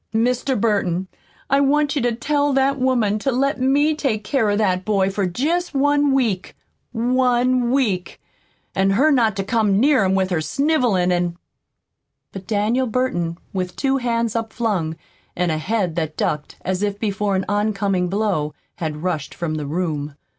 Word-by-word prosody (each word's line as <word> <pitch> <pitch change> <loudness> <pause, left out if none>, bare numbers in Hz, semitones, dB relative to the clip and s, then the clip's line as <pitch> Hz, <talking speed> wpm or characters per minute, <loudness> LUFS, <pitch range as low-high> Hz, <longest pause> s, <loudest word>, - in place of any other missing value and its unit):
Mr. 250 +2 +1
Burton, 190 -4 0 0.4
I 275 +1 +3
want 290 +1 +2
you 285 - 0
to 245 0 +1
tell 290 +4 0
that 270 +1 +2
woman 240 -5 +1
to 270 - 0
let 270 +2 0
me 285 +4 +3
take 255 -8 -1
care 225 0 +1
of 205 - +1
that 185 -4 +1
boy 195 -2 +1
for 195 -1 -1
jest 305 - -1
one 290 +1 +3
week 230 -9 0 0.4
ONE 250 +1 +2
WEEK, 225 -9 0 0.5
an' 195 0 +2
her 265 +11 +3
not 230 -7 +3
to 195 - -2
come 205 -2 +1
near 270 -2 +4
him 190 0 +2
with 190 -1 0
her 165 -3 +1
snivelin' 230 - +1
an' 175 -1 0 0.5
" - - -57
But 190 -1 -8
Daniel 225 +4 +1
Burton, 175 -9 -1 0.2
with 180 -2 -3
two 270 -1 +1
hands 235 -3 -1
upflung, 220 -8 -1 0.4
and 175 -1 0
a 155 - -1
head 190 -2 -1
that 155 -2 -2
ducked 150 -1 -2
as 185 +1 -1
if 205 -1 -1
before 205 -1 -1
an 190 - -1
oncoming 200 -3 0
blow, 185 -7 -1 0.2
had 155 -1 -4
rushed 160 -5 -3
from 170 -3 -3
the 150 -2 -3
room. 150 -3 -3
215 Hz, 170 wpm, -21 LUFS, 185-255 Hz, 0.5 s, near